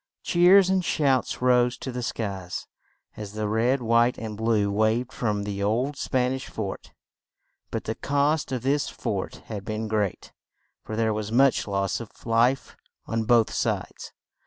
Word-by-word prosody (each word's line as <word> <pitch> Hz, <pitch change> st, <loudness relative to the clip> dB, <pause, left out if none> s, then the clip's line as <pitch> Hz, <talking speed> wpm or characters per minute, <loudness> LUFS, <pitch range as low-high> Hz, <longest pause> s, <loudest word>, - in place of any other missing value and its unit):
Cheers 185 Hz, +2 st, +5 dB
and 190 Hz, -1 st, +2 dB
shouts 135 Hz, -6 st, +1 dB
rose 125 Hz, -1 st, +3 dB
to 130 Hz, -, -5 dB
the 125 Hz, 0 st, -4 dB
skies 100 Hz, -6 st, -4 dB, 0.5 s
as 105 Hz, -1 st, -7 dB
the 110 Hz, 0 st, -2 dB
red, 120 Hz, +5 st, +1 dB
white 115 Hz, +2 st, +3 dB
and 110 Hz, -2 st, -5 dB
blue 110 Hz, -2 st, +1 dB
waved 110 Hz, +4 st, +1 dB
from 105 Hz, -4 st, -1 dB
the 100 Hz, -1 st, -4 dB
old 120 Hz, +8 st, 0 dB
Span 130 Hz, -1 st, 0 dB
ish 130 Hz, 0 st, -5 dB
fort; 100 Hz, -3 st, -6 dB, 0.8 s
but -, -, -3 dB
the -, -, -2 dB
cost 145 Hz, +1 st, 0 dB
of 125 Hz, -3 st, -2 dB
this 140 Hz, +2 st, +1 dB
fort 100 Hz, -6 st, -4 dB
had 105 Hz, -3 st, -6 dB
been 110 Hz, +2 st, -3 dB
great, 105 Hz, -3 st, -2 dB, 0.5 s
for 110 Hz, -, -5 dB
there 110 Hz, -1 st, +1 dB
was 105 Hz, 0 st, -4 dB
much 135 Hz, +1 st, +3 dB
loss 100 Hz, -1 st, -1 dB
of 115 Hz, -3 st, -8 dB, 0.2 s
life 120 Hz, +3 st, +2 dB, 0.3 s
on 115 Hz, 0 st, -2 dB
both 115 Hz, -1 st, +3 dB
sides. -, -, -3 dB
115 Hz, 160 wpm, -25 LUFS, 105-130 Hz, 0.8 s, Cheers